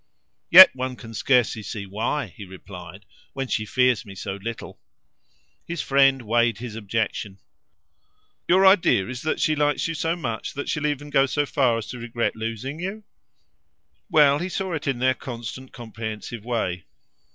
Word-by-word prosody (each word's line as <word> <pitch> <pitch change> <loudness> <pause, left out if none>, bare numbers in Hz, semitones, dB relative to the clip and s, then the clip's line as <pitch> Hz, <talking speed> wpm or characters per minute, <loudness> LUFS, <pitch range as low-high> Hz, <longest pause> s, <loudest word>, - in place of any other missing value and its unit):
"Yet 185 -2 +10
one 130 0 -3
can 115 -2 -11
scarcely 120 -1 +2
see 105 -1 -6
why," 110 +9 -2
he 105 - -9
replied, 95 0 -11 0.3
"when 135 -1 -3
she 105 -1 -1
fears 125 -1 +2
me 100 -3 -11
so 95 +1 -5
little." 110 +4 -7 0.9
His 170 -2 -3
friend 135 -1 +3
weighed 115 0 +1
his 120 -2 -7
objection. 105 -2 -3 1.1
"Your 190 +2 +5
idea 180 - +4
is 130 0 -6
that 155 - -1
she 155 - +2
likes 145 0 +1
you 165 - -3
so 165 +1 -1
much 115 -10 -4
that 140 - -4
she'll 150 0 0
even 145 0 -4
go 135 -1 +4
so 145 +2 0
far 130 -5 +1
as 115 - -5
to 125 - -7
regret 120 0 -2
losing 115 +6 -5
you?" 195 +5 -5 1.1
Well, 150 -4 +5
he 180 - -3
saw 190 -1 -3
it 155 -2 -4
in 135 -3 0
their 130 +1 +2
constant 125 +1 -8
comprehensive 110 -1 -7
way. 110 -8 -2
125 Hz, 165 wpm, -24 LUFS, 110-145 Hz, 1.1 s, Yet